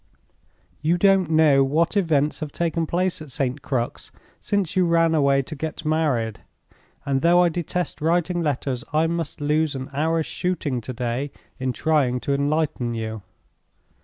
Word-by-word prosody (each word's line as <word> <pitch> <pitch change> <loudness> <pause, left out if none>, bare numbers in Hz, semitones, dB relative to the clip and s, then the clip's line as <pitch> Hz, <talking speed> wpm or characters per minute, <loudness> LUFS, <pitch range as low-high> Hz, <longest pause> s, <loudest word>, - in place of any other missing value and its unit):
You 165 +3 +2
don't 195 -2 +4
know 155 -4 +5
what 160 +7 +1
events 155 -7 +1
have 155 -2 -5
taken 165 0 -1
place 180 0 -1
at 155 - -9
St. 135 0 -2
Crux 125 -4 -3 0.3
since 200 -4 -1
you 185 -2 +3
ran 165 -1 +3
away 140 -3 +3
to 155 - -8
get 155 +2 -5
married; 145 -9 0 0.7
and 135 -1 0
though 175 +1 +5
I 175 - +4
detest 175 0 -3
writing 175 +2 +1
letters, 135 -5 -1
I 155 +1 +3
must 165 -1 -3
lose 150 0 +1
an 130 +1 -6
hour's 160 +3 0
shooting 155 -9 -2
to 125 +3 -6
day 125 +3 -3 0.3
in 130 0 -1
trying 135 -3 +1
to 140 - -1
enlighten 140 -4 0
you. 110 -1 -4
155 Hz, 160 wpm, -23 LUFS, 135-165 Hz, 0.7 s, know